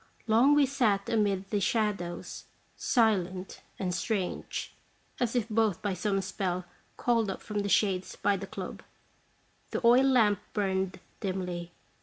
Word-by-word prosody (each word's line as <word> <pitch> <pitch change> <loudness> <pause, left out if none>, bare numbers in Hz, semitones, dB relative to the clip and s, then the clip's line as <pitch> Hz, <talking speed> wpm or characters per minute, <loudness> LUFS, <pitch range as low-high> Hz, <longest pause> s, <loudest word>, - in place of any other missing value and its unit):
Long 235 +6 +5
we 290 -1 +5
sat 230 -8 +1
amid 200 -3 0
the 205 - +2
shadows, 200 -5 -1 0.3
silent 190 -6 +1 0.2
and 180 -2 -2
strange, 185 0 -2 0.5
as 245 -1 0
if 235 -3 +1
both 220 -4 +1
by 205 -2 0
some 195 +2 0
spell 185 -1 -2 0.3
called 230 -4 +2
up 195 - -4
from 210 -2 -4
the 200 0 -1
shades 190 -3 +1
by 200 - +1
the 195 0 -5
club. - - -7 0.9
The - - -2
oil 245 +3 +7
lamp 220 -7 +4
burned 190 -2 -1 0.2
dimly. 180 -3 -3
200 Hz, 140 wpm, -29 LUFS, 185-225 Hz, 0.9 s, oil